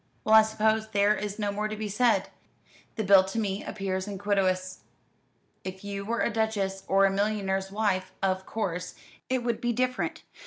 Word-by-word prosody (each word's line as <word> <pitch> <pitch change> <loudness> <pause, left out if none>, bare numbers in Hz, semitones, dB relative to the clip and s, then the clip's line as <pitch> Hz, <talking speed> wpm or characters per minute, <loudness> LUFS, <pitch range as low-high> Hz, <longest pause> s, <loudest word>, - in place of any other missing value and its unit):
"Well, 215 - +2
I 220 - +10
suppose 220 0 +1
there 205 0 +3
is 205 0 -4
no 205 -2 -1
more 210 +1 -2
to 215 - -5
be 215 0 -4
said. 230 +4 +2 0.7
The 220 - -1
bill 195 -1 +7
to 195 +4 -5
me 200 -2 -1
appears 190 -1 -3
iniquitous. 190 -2 0 0.8
If 190 +1 -7
you 200 -1 -4
were 235 +2 -1
a 235 - 0
duchess 205 -4 -1
or 195 +1 +4
a 195 - +3
millionaire's 195 -1 -1
wife, 195 -3 0
of 190 0 -1
course 180 -4 -3 0.3
it 255 -1 0
would 235 -2 -1
be 240 0 0
different. 255 +2 -1
205 Hz, 180 wpm, -28 LUFS, 190-220 Hz, 0.8 s, I